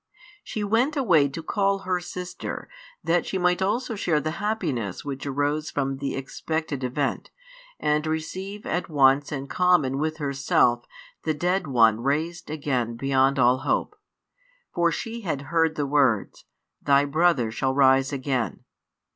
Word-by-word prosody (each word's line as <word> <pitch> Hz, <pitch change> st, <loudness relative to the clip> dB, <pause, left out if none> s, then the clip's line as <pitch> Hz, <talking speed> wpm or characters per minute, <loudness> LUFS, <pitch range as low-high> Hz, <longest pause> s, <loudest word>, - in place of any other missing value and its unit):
She 215 Hz, -, -4 dB
went 235 Hz, +9 st, +1 dB
away 170 Hz, -, +4 dB
to 160 Hz, +4 st, -7 dB
call 195 Hz, +2 st, 0 dB
her 185 Hz, -1 st, 0 dB
sister, 180 Hz, 0 st, -6 dB, 0.4 s
that 175 Hz, +1 st, +1 dB
she 190 Hz, -, -2 dB
also 190 Hz, +7 st, 0 dB
might 210 Hz, -, -6 dB
share 160 Hz, -6 st, +1 dB
the 155 Hz, +2 st, -2 dB
happiness 150 Hz, -, -2 dB
which 140 Hz, 0 st, -5 dB
arose 145 Hz, +2 st, -1 dB
from 135 Hz, -1 st, -2 dB
the 140 Hz, 0 st, -3 dB
expected 145 Hz, +1 st, -4 dB
event, 135 Hz, +2 st, -2 dB, 0.5 s
and 150 Hz, +1 st, +1 dB
receive 185 Hz, +6 st, -4 dB
at 175 Hz, -, -2 dB
once 140 Hz, -1 st, +3 dB
in 140 Hz, -2 st, -4 dB
common 155 Hz, -5 st, +2 dB
with 155 Hz, +1 st, -1 dB
herself 135 Hz, -4 st, +1 dB, 0.4 s
the 155 Hz, -1 st, 0 dB
dead 180 Hz, +2 st, 0 dB
one 115 Hz, -4 st, +4 dB
raised 155 Hz, +7 st, -2 dB
again 130 Hz, -6 st, -2 dB
beyond 135 Hz, +2 st, +2 dB
all 125 Hz, 0 st, +4 dB
hope. -, -, -1 dB, 0.8 s
For 170 Hz, -1 st, +2 dB
she 230 Hz, +9 st, -5 dB
had 155 Hz, -8 st, -3 dB
heard 165 Hz, -1 st, +3 dB
the 145 Hz, -, -1 dB
words: 135 Hz, -7 st, +1 dB, 0.4 s
Thy 140 Hz, 0 st, +4 dB
brother 145 Hz, -5 st, +2 dB
shall 130 Hz, +3 st, -1 dB
rise 135 Hz, 0 st, +4 dB
again. 130 Hz, -3 st, -2 dB
150 Hz, 145 wpm, -25 LUFS, 135-175 Hz, 0.8 s, away